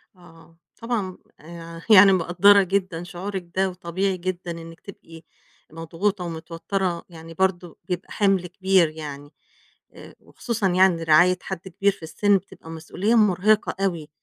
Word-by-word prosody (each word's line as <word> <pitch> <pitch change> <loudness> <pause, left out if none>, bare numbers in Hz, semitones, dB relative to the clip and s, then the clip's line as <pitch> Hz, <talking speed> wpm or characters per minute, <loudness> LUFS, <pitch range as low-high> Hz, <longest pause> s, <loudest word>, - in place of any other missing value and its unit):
آه، 165 -2 -19 0.2
طبعًا 220 -6 -4 0.2
آآ 165 0 -11
يعني 200 -1 +8
مقدّرة 185 +3 +4
جدًا 185 -3 -2
شعورِك 180 0 -6
ده 190 0 +1
وطبيعي 185 +1 -3
جدًا 180 -1 -5
إنِّك 165 0 -10
تبقي 165 -4 -13 0.5
مضغوطة 175 +4 -3
ومتوتَّرة، 170 +2 -4
يعني 165 -1 -12
برضه 180 -1 -2
بيبقى 180 +2 -5
حِمْل 195 -3 +1
كبير 185 -1 +2
يعني 145 -2 -9 0.6
آآ - - -14
وخصوصًا 225 -5 -3
يعني 180 -2 +3
رعاية 175 +3 +4
حد 190 -1 -7
كبير 195 +3 +1
في 190 - -16
السِن 200 +5 +2
بتبقى 185 -3 -13
مسؤوليّة 180 +7 -2
مُرهقة 210 0 +2
أوي. 165 -5 -3
180 Hz, 135 wpm, -23 LUFS, 165-195 Hz, 0.6 s, يعني